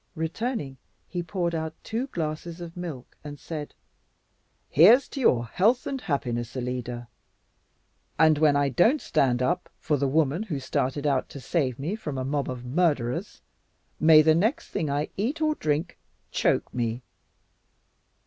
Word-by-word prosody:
Returning, 160 - -3 0.3
he 175 - -3
poured 175 -1 -2
out 160 -1 -3
two 235 +4 -3
glasses 165 - -4
of 170 -1 -8
milk 165 -8 -7
and 145 -1 -8
said, 150 -3 -6 0.9
"Here's 220 - +6
to 280 - -6
your 120 - +3
health 220 - +2
and 270 -2 -3
happiness, 120 -4 -2
Alida; 125 -1 -4 1.1
and 155 -2 +5
when 150 -2 +4
I 145 -1 +2
don't 225 - +3
stand 125 - +1
up 175 +6 -1
for 150 - 0
the 140 0 0
woman 150 +4 +1
who 175 -11 -3
started 135 +2 -2
out 140 -3 +1
to 140 - -9
save 130 -2 -1
me 160 +9 -3
from 150 -11 -5
a 130 - -2
mob 140 0 -1
of 125 -1 -6
murderers, 135 -4 -1 0.6
may 155 -1 +7
the 160 0 +5
next 215 - 0
thing 155 - -2
I 145 +2 -1
eat 250 +11 -1
or 310 -1 +2
drink 155 - -2 0.3
choke - - +1
me. 120 0 -2
155 Hz, 155 wpm, -26 LUFS, 135-175 Hz, 1.1 s, may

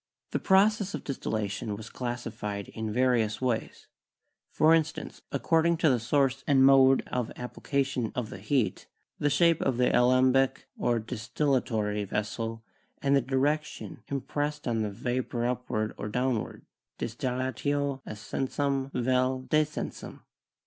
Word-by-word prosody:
The - - 0
process 200 +1 +3
of - - -6
dis 140 - -4
tillation 105 -1 -2
was 110 +1 -9
classified 115 -5 -4
in 110 -1 -4
various 120 -2 +2
ways; 125 -3 -2 0.6
for 155 +1 +4
instance, 160 -1 -1
ac - - -2
cording 165 +1 +3
to 160 -3 +4
the 125 - +2
source 135 +2 +1
and 135 -2 +5
mode 135 -1 +6
of 125 -3 -2
application 130 -1 -2
of 120 -2 -3
the - - -7
heat, 135 -7 0 0.3
the 145 - +2
shape 165 +3 +3
of 130 -3 +1
the 125 - +3
alembic 130 +2 +3
or 120 -1 +1
distillatory 110 -2 -1
vessel, 115 +3 -3 0.4
and 140 0 +2
the 140 - +4
direction 140 +4 -1
impressed 145 +1 -3
on 115 -2 +1
the 105 - -1
vapor 120 +2 -2
upward 120 -3 -1
or 105 - -4
downward 125 0 -2 0.3
('distillatio 130 +3 -2
ascensum 135 +5 -2
vel 130 +1 +1
decensum'). 155 0 -1
130 Hz, 135 wpm, -28 LUFS, 115-140 Hz, 0.6 s, mode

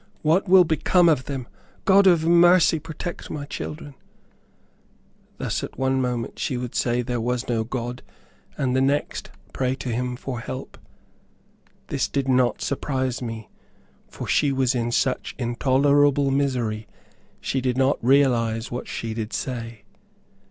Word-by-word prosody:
What 170 +5 +2
will 185 0 +8
become 170 +2 +3
of 150 -6 +2
them? 130 -4 -5 0.4
God 195 0 +6
of 170 -3 +4
mercy, 170 -1 +5
protect 160 +2 -7
my 145 -1 -5
children!" 150 0 -7 1.4
Thus, - - -2
at - - -7
one 130 0 +1
moment, 125 -2 -3
she 130 - -1
would 125 -1 -5
say 120 0 0
there 120 -1 -2
was 125 +1 -2
no 115 -2 0
God, 120 +1 -5 0.6
and 130 -3 0
the 130 - +3
next, 140 +2 -1 0.2
pray 130 0 0
to 130 - -6
him 125 +1 -2
for 125 -1 -5
help. 130 +2 -7 1.1
This - - 0
did 135 -1 -2
not 125 -2 +2
surprise 130 -2 -2
me, 115 -2 -6 0.6
for - - -8
she 145 - +2
was 130 -1 +1
in 120 -1 -1
such 130 +1 -1
intolerable 140 +3 +2
misery 125 -6 -1 0.5
she 135 - -2
did 125 -1 -1
not 135 -1 +1
realize 120 -4 +2
what 125 - -5
she 115 -1 -4
did 110 -1 -5
say. 115 -4 -5
130 Hz, 145 wpm, -24 LUFS, 120-145 Hz, 1.4 s, will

